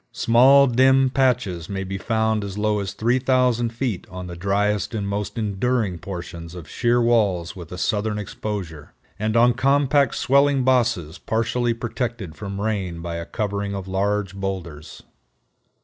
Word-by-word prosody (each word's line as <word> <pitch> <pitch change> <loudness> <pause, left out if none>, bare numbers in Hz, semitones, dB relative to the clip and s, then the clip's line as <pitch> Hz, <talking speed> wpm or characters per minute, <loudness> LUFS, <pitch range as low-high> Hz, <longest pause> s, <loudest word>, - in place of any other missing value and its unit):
Small 130 +4 +6
dim 130 +1 +4
patches 120 -11 0
may 95 -1 -3
be 95 0 -5
found 110 0 0
as 100 0 -6
low 105 0 +1
as 100 -2 -4
3000 125 0 +2
feet 115 -4 -3
on 90 -1 -7
the 90 -1 -7
driest 105 +4 0
and 100 -2 -2
most 100 +3 -3
enduring 105 -2 -1
portions 85 -2 -7
of 85 -4 -9
sheer 120 +7 +1
walls 105 -8 +1
with 85 -3 -10
a 90 - -6
southern 105 +1 -1
exposure, 95 -7 -6 0.3
and 110 +2 0
on 120 +1 +5
compact 140 +1 +2
swelling 140 0 +3
bosses 120 -11 +1
partially 115 +1 0
protected 115 -6 -4
from 100 -1 -6
rain 100 -5 -2
by 85 0 -5
a 85 - -6
covering 100 -1 -3
of 95 -1 -6
large 100 0 -1
boulders. 95 -6 -6
105 Hz, 150 wpm, -22 LUFS, 95-120 Hz, 0.3 s, Small